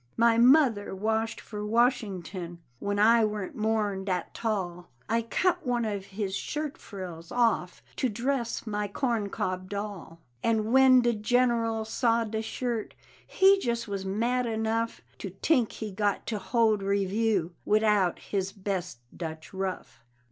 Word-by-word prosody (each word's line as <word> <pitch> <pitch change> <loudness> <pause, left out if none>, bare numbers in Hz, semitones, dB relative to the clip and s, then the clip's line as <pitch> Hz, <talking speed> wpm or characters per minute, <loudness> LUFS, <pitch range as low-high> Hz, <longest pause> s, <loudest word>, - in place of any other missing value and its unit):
My 230 0 +5
mother 245 -6 +4
washed 220 +3 -1
for 210 -1 -7
Washington 195 -7 0 0.2
When 205 0 -2
I 225 +2 +5
warn't 210 -3 -2
more'n 215 -3 0
dat 180 -3 -2
tall; 180 -6 -3 0.2
I 230 +1 +1
cut 355 +10 0
one 245 -2 0
of 200 -3 -3
his 195 -1 -3
shirt 300 +4 -3
frills 175 -5 -8
off 230 -7 +1
To 260 - +1
dress 240 +2 -2
my 210 -1 -2
corn 225 -1 -1
cob 185 -1 -3
doll; 200 -5 -6 0.2
And 220 0 +1
when 260 -1 +7
de 240 0 +2
General 230 0 +1
saw 230 +1 +1
de 220 0 -3
shirt, 230 0 -3 0.3
He 390 +1 +5
jus' 235 -6 -2
was 200 -2 -3
mad 235 +6 0
enough 225 +1 -1 0.2
To 195 - -5
tink 230 - +1
he 215 -2 -5
got 205 +1 -1
to 215 -3 -2
hold 220 0 +2
review 200 -2 0
Widout 210 -4 +3
his 195 -1 -3
best 185 - -4
Dutch 160 -1 -7
ruff. 190 -10 -5
215 Hz, 145 wpm, -28 LUFS, 195-235 Hz, 0.3 s, when